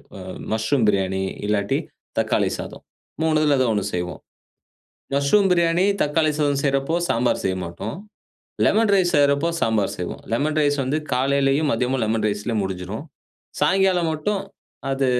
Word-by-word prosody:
ம - - -8 0.3
மஷ்ரூம் 110 +3 +1
பிரியாணி, 95 -1 +1 0.2
இல்லாட்டி 100 -1 +1 0.4
தக்காளி - - +1
சாதம். - - -8 0.4
3துல 155 -3 +3
ஏதோ 130 - +3
ஒண்ணு 105 -2 0
செய்வோம். 90 0 -4 0.9
மஷ்ரூம் 185 +8 +3
பிரியாணி, 170 +1 +3 0.2
தக்காளி 155 +1 +2
சாதம் 145 -2 +1
செய்யுறப்போ 140 +3 +1
சாம்பார் 120 +2 +1
செய்ய 95 -1 +1
மாட்டோம். 90 +6 -6 0.7
லெமன் 220 +1 +3
ரைஸ் 185 -3 +3
செய்யுறப்போ 140 +2 +3
சாம்பார் 110 -3 +1
செய்வோம். 90 - -5
லெமன் 150 +5 0
ரைஸ் 145 -1 +2
வந்து 140 +4 0
காலையிலேயும், 140 +3 +2
மதியமும் 125 +2 0
லெமன் 110 0 0
ரைஸ்லேயே 105 +2 -2
முடிஞ்சிடும். 95 +6 -5 0.6
சாயங்காலம் 185 +1 +3
மட்டும் 195 +6 -1 0.5
அது 135 0 +1
140 Hz, 135 wpm, -22 LUFS, 110-155 Hz, 0.9 s, 3துல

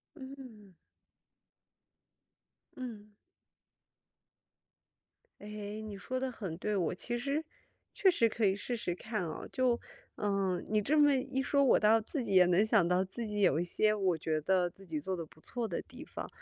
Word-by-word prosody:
嗯。 260 - -11 2.0
嗯。 225 -5 -7 2.3
诶， 210 +1 -6
你 210 -2 -6
说 255 +6 -3
得 260 -1 -2
很 190 -8 -6
对， 210 +2 -1
我 175 -3 0
其 240 +6 -3
实 280 +5 -1 0.5
确 385 - +4
实 235 -10 +4
可 225 0 -3
以 190 0 +3
试 240 +4 -3
试 175 -6 -2
看 215 -1 -3
啊， 155 - -6
就 250 -2 +2 0.4
呃， 195 -3 0
你 215 0 +2
这 300 +8 +2
么 290 -1 +6
一 265 0 -1
说， 280 0 +3
我 270 - +5
倒 220 +1 +5
自 255 +4 -3
己 195 - -2
也 180 -1 +7
能 180 +4 +4
想 215 -6 +4
到 180 +2 +2
自 230 +5 -5
己 210 -1 -2
有 170 -5 +4
一 - - +1
些 215 +4 +2
我 190 -5 +1
觉 155 0 -1
得 185 +2 +2
自 190 +3 -13
己 160 -3 -3
做 185 +5 -3
的 170 - -4
不 155 - -20
错 235 +7 -4
的 180 - -3
地 260 +3 -11
方。 - - -7
210 Hz, 185 characters per minute, -32 LUFS, 185-245 Hz, 2.3 s, 也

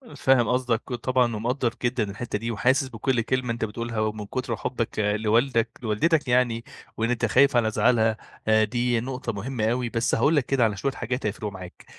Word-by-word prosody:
فاهم 130 -3 +3
قصدك 125 -2 0
طبعًا 125 -1 0
ومقدّر 120 +2 -1
جدًا 120 -1 +1
الحتّة 105 +1 -4
دي 115 +2 -3
وحاسس 130 +4 +2
بكلّ 125 0 -1
كلمة 125 0 -1
أنتَ 115 -1 -2
بتقولها، 115 +1 -4
ومن 110 -1 -2
كتر 120 +2 -3
حبّك 115 -1 -3
لوالدك 110 +3 +2
لوالدتك 145 +8 +1
يعني، 120 -2 +2 0.3
وإن 115 +1 0
أنتَ 120 -1 +1
خايف 130 +5 +4
على 115 -2 +3
زعلها، 110 -2 +2 0.5
دي 120 +2 0
نقطة 125 -1 -4
مهمّة 110 +2 -3
أوي 120 0 -1
بس 115 +1 0
هاقول 140 +8 +3
لك 140 -4 +2
كده 135 -3 +2
على 105 -3 +1
شوية 140 +6 -1
حاجات 125 0 -4
هيفرقوا 105 0 -3
معاك، 90 -2 -11
120 Hz, 180 wpm, -25 LUFS, 110-125 Hz, 0.5 s, خايف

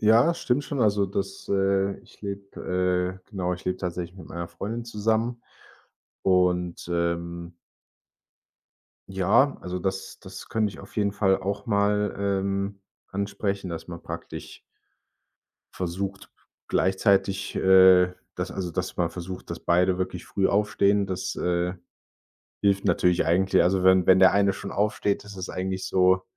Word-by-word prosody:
Ja, 115 +10 +5
stimmt 145 -4 0
schon. 140 -3 -3
Also, 100 -2 +3
das 95 0 -4
äh, 95 0 +1
ich - - -21
lebe 90 -2 -2
äh, - - -35
genau, 90 -3 -2
ich 90 - -13
lebe 90 0 -1
tatsächlich 90 0 -4
mit 90 - -11
meiner 85 0 -5
Freundin 115 +3 -5
zusammen. 115 +2 -1 0.8
Und, 90 -2 +1
ähm 85 0 -2 1.5
ja, 95 +9 +3
also, 90 0 -4
das 95 +1 -4
das 95 -1 -10
könnte 110 -2 0
ich - - -12
auf - - -13
jeden 100 -2 +1
Fall 95 -2 +2
auch 100 +5 -4
mal, 105 -1 +1
ähm, 100 0 -1 0.3
ansprechen, 100 -1 -3
dass 85 0 -6
man 85 -1 -8
praktisch - - -8 1.1
Versucht 95 +2 -4 0.4
gleichzeitig, 95 0 +1
äh, 95 -1 +6 0.2
dass - - -3
also, 90 -3 -4
dass 90 +1 -3
man 85 -1 +1
versucht, 90 +1 -8
dass - - -5
beide 90 +1 +2
wirklich 90 -1 -4
früh 95 -1 0
aufstehen. 100 -1 +2
Das, 95 0 -3
äh, 90 +1 0 0.9
hilft 100 -1 +2
natürlich 90 -2 +2
eigentlich. 95 +4 +3
Also, 95 +1 +2
wenn 95 -1 +5
wenn 95 0 +6
der 95 - +7
eine 100 0 +3
schon 100 - -7
aufsteht, 105 0 0
ist 105 -1 -10
es 95 - -5
eigentlich 95 0 -3
so 95 0 +3
95 Hz, 145 wpm, -26 LUFS, 90-100 Hz, 1.5 s, der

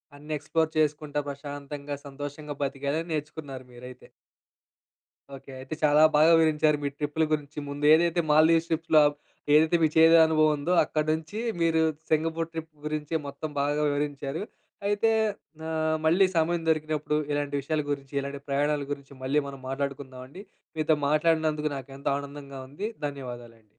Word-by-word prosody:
అన్నీ 150 +2 -11
ఎక్స్‌ప్లోర్ 160 +2 0
చేసుకుంటా, 150 -1 0
ప్రశాంతంగా 145 0 -6
సంతోషంగా, 145 +1 -7
బ్రతికెడం 140 +4 -2
నేర్చుకున్నారు 145 -3 -5
మీరైతే. 125 +1 -12 1.3
ఓకే. 135 0 -12
అయితే 130 +4 -6
చాలా 150 0 +5
బాగా 155 +2 +6
వివరించారు. 155 -1 +3
మీ 140 - 0
ట్రిప్పుల 150 +2 -1
గురించి 150 -1 -4
ముందు 145 +1 -3
ఏదైతే 170 +1 +3
మాల్‌దివ్స్ 160 +2 +5
ట్రిప్స్‌లో 160 -1 +3 0.5
ఏదైతే 155 +3 +5
మీకు 155 -1 +2
చేదు 165 +1 +7
అనుభవం 155 -1 +3
ఉందో, 160 +6 -1
అక్కడి 155 0 -2
నుంచి 160 +7 -5 0.2
మీరు 165 -1 +3 0.3
సింగపూర్ 165 +1 0
ట్రిప్ 160 -1 -6 0.2
గురించి 150 +1 -3
మొత్తం 140 +2 -6
బాగా 145 +1 0
వివరించారు. 145 +2 -3 0.4
అయితే 205 +2 +2 0.6
ఆహ్, 160 0 0
మళ్ళీ 175 +5 +5
సమయం 165 +1 +1
దొరికినప్పుడు 155 -1 0
ఇలాంటి 145 0 -1
విషయాల 155 +2 -1
గురించి, 140 -1 -5
ఇలాంటి 140 0 -5
ప్రయాణాల 145 +1 +1
గురించి, 140 -1 -6
మళ్ళీ 145 +3 +2
మనం 135 -1 -9
మాట్లాడుకుందాం 135 -1 -4
అండి. 180 +9 -11 0.3
మీతో 155 0 +3
మాట్లాడినందుకు 155 0 +2
నాకు 135 0 -9
ఎంత 140 - -8
ఆనందంగా 140 -1 -8
ఉంది. 195 +10 -4 0.2
ధన్యవాదాలండి. 120 -5 -9
150 Hz, 140 wpm, -27 LUFS, 140-160 Hz, 1.3 s, చేదు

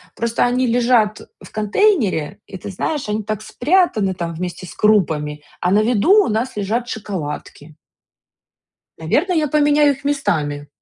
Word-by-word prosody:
Просто 235 0 0
они 250 +1 +1
лежат 235 -3 +2 0.2
в - - -13
контейнере, 210 - +1
и, 190 - -8
ты 185 - -8
знаешь, 270 - -3
они 210 0 -2
так 215 0 -4
спрятаны 250 - +1
там, 170 -2 -4
вместе 180 +2 -5
с - - -10
крупами, 155 -8 +1 0.2
а 180 - +1
на 210 +2 +4
виду, 250 - +4
у - - -2
нас 225 +2 -2
лежат 225 +5 -2
шоколадки. 155 -6 -6 1.2
Наверно, 290 - 0
я 315 -3 +1
поменяю 295 0 +4
их 270 +1 -11
местами. 150 - -1
215 Hz, 150 wpm, -19 LUFS, 180-260 Hz, 1.2 s, на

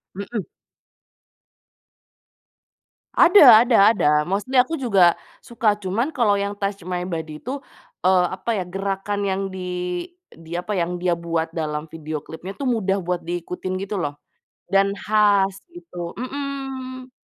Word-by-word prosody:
Hmm. 200 +2 -4 2.8
Ada 250 - +8
ada 235 -2 +3 0.2
ada. 150 - +1 0.2
Mostly 230 +7 -1
aku 325 +6 -3
juga 195 -10 +4 0.2
suka, 230 -3 +1
cuman 225 +11 -1
kalo 215 -6 +2
yang 200 0 -2
Touch 200 -3 -3
My 180 -1 -2
Body 160 -2 -5
itu, 265 +4 -4 0.5
eee, 185 -1 +5
apa 190 +5 -7
ya, - - -2
gerakan 195 +2 -3
yang 195 0 -1
di 190 0 -7 0.7
di 165 +1 -12
apa 180 +3 -2
yang 175 +1 -2
dia 175 -2 +1
buat 165 -1 -2
dalam 155 -1 -4
video 155 -1 -5
klipnya 180 +4 -8
itu 240 - -13
mudah 200 -4 0
buat 180 0 -1
diikutin 180 +2 -4
gitu 200 +1 -3
loh 145 -5 -2 0.6
dan 195 0 +3
khas 200 -2 +2 0.2
gitu 175 - -8
mhm. 265 -1 -5
195 Hz, 135 wpm, -22 LUFS, 175-230 Hz, 2.8 s, Ada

